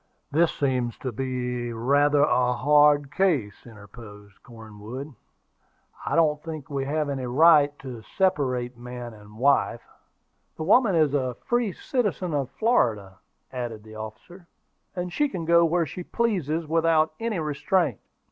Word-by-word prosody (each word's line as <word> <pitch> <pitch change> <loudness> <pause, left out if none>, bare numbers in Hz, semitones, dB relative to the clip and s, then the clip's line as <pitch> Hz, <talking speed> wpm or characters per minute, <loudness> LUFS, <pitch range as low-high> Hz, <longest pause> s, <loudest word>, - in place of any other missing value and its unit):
"This 165 +3 +3
seems 125 -4 -1
to 130 - -5
be 125 -1 -3
rather 140 +5 +2
a 125 -4 +2
hard 145 +2 +4
case," 145 - 0
interposed 105 -2 -14
Cornwood. 115 +5 -10 0.9
"I - - 0
don't 150 -3 +2
think 155 -3 -7
we 135 -1 -2
have 150 +1 -1
any 135 -3 -3
right 145 +1 +5
to 125 -4 -9 0.2
separate 130 -10 0
man 120 0 -8
and 105 0 -15
wife." 140 +4 +2 0.7
"The 160 - -4
woman 205 +2 +4
is 155 -3 +3
a 130 -3 -1
free 240 -4 +1
citizen 200 - -2
of 140 -3 -1
Florida," 110 - 0 0.3
added 120 -4 -5
the 110 0 -13
officer; 115 - -10 0.5
"and 180 -1 -4
she 295 +9 +1
can 175 -7 -5
go 170 +1 +5
where 170 +1 +1
she 170 +5 -7
pleases 170 - -1
without 160 -1 +2
any 225 -3 -2
restraint." 155 - 0
140 Hz, 140 wpm, -25 LUFS, 120-165 Hz, 0.9 s, right